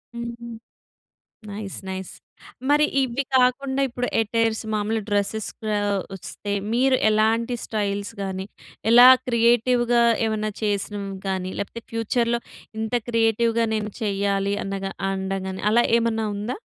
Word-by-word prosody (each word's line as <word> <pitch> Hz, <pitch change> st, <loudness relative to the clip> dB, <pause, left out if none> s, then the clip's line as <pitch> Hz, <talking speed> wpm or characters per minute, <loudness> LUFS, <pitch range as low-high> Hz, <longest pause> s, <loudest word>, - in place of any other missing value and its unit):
హుహు. 235 Hz, 0 st, -6 dB, 1.0 s
Nice. 200 Hz, -1 st, -6 dB
Nice. 190 Hz, -1 st, -5 dB, 0.6 s
మరి 295 Hz, +1 st, +5 dB, 0.2 s
ఇవి 260 Hz, +2 st, -1 dB
కాకుండా 265 Hz, +2 st, +2 dB
ఇప్పుడు 245 Hz, 0 st, -3 dB
అటైర్స్ 225 Hz, 0 st, 0 dB
మామూలుగా 215 Hz, 0 st, -1 dB
డ్రెసెస్ 205 Hz, +1 st, 0 dB, 0.3 s
ఆహ్, 205 Hz, -1 st, 0 dB, 0.2 s
వస్తే 200 Hz, +2 st, -7 dB, 0.2 s
మీరు 260 Hz, +2 st, +3 dB
ఎలాంటి 225 Hz, +3 st, +2 dB
స్టైల్స్ 205 Hz, -2 st, -2 dB
గాని, 190 Hz, 0 st, -3 dB, 0.4 s
ఎలా 245 Hz, +2 st, +9 dB, 0.2 s
క్రియేటివ్‌గా 240 Hz, 0 st, +3 dB, 0.2 s
ఏమన్నా 215 Hz, -1 st, -1 dB
చేసినవి 200 Hz, -1 st, -2 dB
గాని, 185 Hz, -1 st, -2 dB
లేపోతే 230 Hz, +3 st, -5 dB
ఫ్యూచర్‌లో 235 Hz, +1 st, 0 dB, 0.4 s
ఇంత 220 Hz, +2 st, -3 dB
క్రియేటివ్‌గా 230 Hz, 0 st, +2 dB
నేను 210 Hz, -1 st, -3 dB
చెయ్యాలి 200 Hz, -1 st, 0 dB
అన్నగా 195 Hz, 0 st, -4 dB, 0.2 s
అనడం 190 Hz, 0 st, -2 dB
గాని 190 Hz, 0 st, -6 dB
అలా 240 Hz, +1 st, +5 dB, 0.2 s
ఏమన్నా 225 Hz, -1 st, 0 dB
ఉందా? 220 Hz, -, -4 dB
220 Hz, 120 wpm, -23 LUFS, 200-235 Hz, 1.0 s, ఎలా